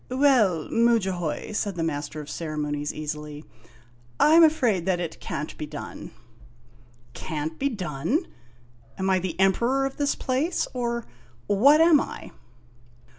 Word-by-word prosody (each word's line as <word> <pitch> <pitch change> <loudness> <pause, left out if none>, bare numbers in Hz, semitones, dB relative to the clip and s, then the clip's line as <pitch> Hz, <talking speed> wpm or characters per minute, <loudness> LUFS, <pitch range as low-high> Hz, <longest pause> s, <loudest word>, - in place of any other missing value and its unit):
"Well, 250 - +3
Mudjahoy," 190 -10 +1
said 205 -2 -2
the 165 - -2
Master 150 -1 -3
of 145 - -11
Ceremonies, 150 -2 -3
easily, 150 0 -6 0.4
" 120 0 -31
I 310 - +6
'm 335 - +8
afraid 240 - +2
that 185 -2 +1
it 170 -2 -5
can't 150 +2 -5
be 150 - -4
done! - - -8 0.5
' 120 0 -29 0.2
"Can't 155 0 -4
be 280 - +1
done? 185 - -2 0.7
Am 190 0 0
I 185 - +3
the 180 -1 -5
Emperor 235 +8 +2
of 270 - -5
this 285 -1 0
place, 275 +7 -1
or 235 -2 -2 0.4
what 275 +10 +5
am 325 -3 +6
I?" - - -8
185 Hz, 145 wpm, -25 LUFS, 150-250 Hz, 0.7 s, m